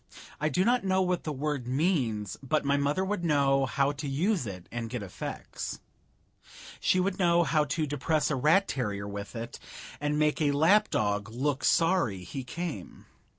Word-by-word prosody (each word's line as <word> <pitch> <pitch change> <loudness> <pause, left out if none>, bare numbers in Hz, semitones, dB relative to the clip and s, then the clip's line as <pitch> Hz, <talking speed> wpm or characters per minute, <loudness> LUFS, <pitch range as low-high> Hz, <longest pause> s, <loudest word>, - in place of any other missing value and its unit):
I 155 - +1
do 180 +6 +1
not 245 0 +3
know 190 0 +2
what 180 -1 -1
the 155 - -2
word 145 -3 -3
means, 125 - 0
but 145 +2 0
my 140 0 +3
mother 145 +6 +1
would 195 -2 -2
know 140 -4 +3
how 140 +3 +1
to 145 0 -6
use 165 - 0
it 90 -3 -8
and 115 -1 -4
get 120 -3 -4
effects. 95 - -6 1.0
She 185 - +2
would 185 +1 0
know 170 -1 +4
how 155 -2 +2
to 155 +2 -1
depress 150 +2 0
a - - +1
rat 160 +9 +4
terrier 105 -6 -3
with 100 +2 -7
it 115 0 -6 0.4
and 145 0 0
make 150 +1 +1
a 145 -2 +3
lap 165 +9 +4
dog 105 -1 0
look 135 +4 -1
sorry 165 - +2
he 130 +8 -6
came. 125 - -6
145 Hz, 180 wpm, -29 LUFS, 125-170 Hz, 1.0 s, know